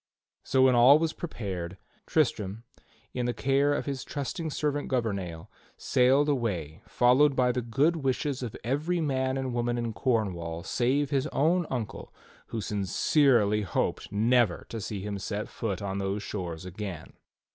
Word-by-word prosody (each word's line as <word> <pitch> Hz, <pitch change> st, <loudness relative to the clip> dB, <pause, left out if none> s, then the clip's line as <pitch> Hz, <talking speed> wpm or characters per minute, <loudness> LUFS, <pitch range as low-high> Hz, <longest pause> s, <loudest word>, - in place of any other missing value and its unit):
So 130 Hz, -1 st, +3 dB
when 130 Hz, -1 st, +6 dB
all 125 Hz, +4 st, +7 dB
was 160 Hz, 0 st, -1 dB
prepared, 95 Hz, -, -5 dB, 0.3 s
Tristram, 110 Hz, -8 st, 0 dB, 0.5 s
in 125 Hz, -1 st, -1 dB
the 120 Hz, -, -1 dB
care 140 Hz, +2 st, +2 dB
of -, -, -2 dB
his 135 Hz, -2 st, -3 dB
trusted 155 Hz, +3 st, -4 dB
serving 145 Hz, 0 st, -1 dB
man -, -, -8 dB
Gouvernail, 100 Hz, -10 st, -3 dB, 0.3 s
sailed 130 Hz, +4 st, +3 dB
away 100 Hz, -, -2 dB
followed 130 Hz, +4 st, +4 dB
by 125 Hz, -1 st, +3 dB
the 125 Hz, -, -1 dB
good 140 Hz, +9 st, +1 dB
wishes 135 Hz, -1 st, -1 dB
of 120 Hz, -4 st, -5 dB
every 150 Hz, +9 st, 0 dB
man 130 Hz, -4 st, 0 dB
and 130 Hz, -2 st, -3 dB
woman 120 Hz, 0 st, 0 dB
in 120 Hz, -1 st, -2 dB
Cornwall 90 Hz, -10 st, -1 dB
save 130 Hz, +7 st, 0 dB
his 140 Hz, +1 st, +1 dB
own 165 Hz, +4 st, +1 dB
uncle 120 Hz, -5 st, -5 dB, 0.4 s
who 115 Hz, -, -4 dB
sin 105 Hz, 0 st, -2 dB
cerely 105 Hz, -, +3 dB
hoped 95 Hz, -, -2 dB
never 115 Hz, -1 st, +2 dB
to 115 Hz, -, -5 dB
see 100 Hz, 0 st, -4 dB
him 100 Hz, 0 st, -4 dB
set 105 Hz, +2 st, -3 dB
foot 100 Hz, -4 st, -4 dB
on 100 Hz, 0 st, -3 dB
those 100 Hz, +1 st, -2 dB
shores 90 Hz, -5 st, -5 dB
again. 90 Hz, -2 st, -7 dB
120 Hz, 160 wpm, -28 LUFS, 100-140 Hz, 0.5 s, all